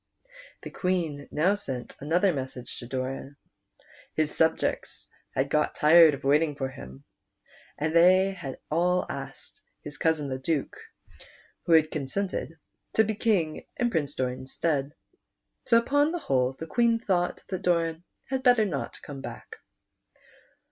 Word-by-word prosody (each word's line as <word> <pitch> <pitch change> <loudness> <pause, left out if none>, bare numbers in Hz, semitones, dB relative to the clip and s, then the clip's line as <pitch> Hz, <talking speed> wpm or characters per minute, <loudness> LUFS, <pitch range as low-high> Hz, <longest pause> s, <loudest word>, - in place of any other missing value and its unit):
The - - -7
Queen 165 -6 -2
now 170 +7 +2
sent 135 -12 -5
another 175 +6 +2
message 130 -3 -6
to 120 - -9
Doran. 135 +2 -4 0.8
His 155 -1 0
subjects 160 0 0 0.3
had 135 +2 0
got 150 0 +1
tired 160 0 +7
of - - -13
waiting 150 +2 +3
for 135 -2 -3
him, 65 - -11 0.7
and 155 +2 -1
they 185 +3 +6
had 140 -9 -7
asked 180 - -2 0.2
his - - -7
cousin 160 -3 +1
the 130 -1 -3
Duke, 145 +1 -1 0.9
who 170 - +4
had 160 -1 +5
con 150 -3 -3
sented, 180 +1 -3 0.4
to 220 - +5
be 220 0 -1
King 195 -8 0
in 240 -1 +1
Prince 145 -6 -1
Doran's 130 +1 -3
stead. 145 -3 -1 0.7
So 230 - +6
upon 285 +6 +2
the 350 - -2
whole 130 - +1
the 160 - -7
Queen 235 +6 +2
thought 180 -5 -1
that 185 -2 -3
Doran 170 -2 0 0.2
had 265 -1 -2
better 245 -4 +5
not 160 -9 -4
come 140 -2 -8
back. - - -9
160 Hz, 145 wpm, -27 LUFS, 140-185 Hz, 0.9 s, tired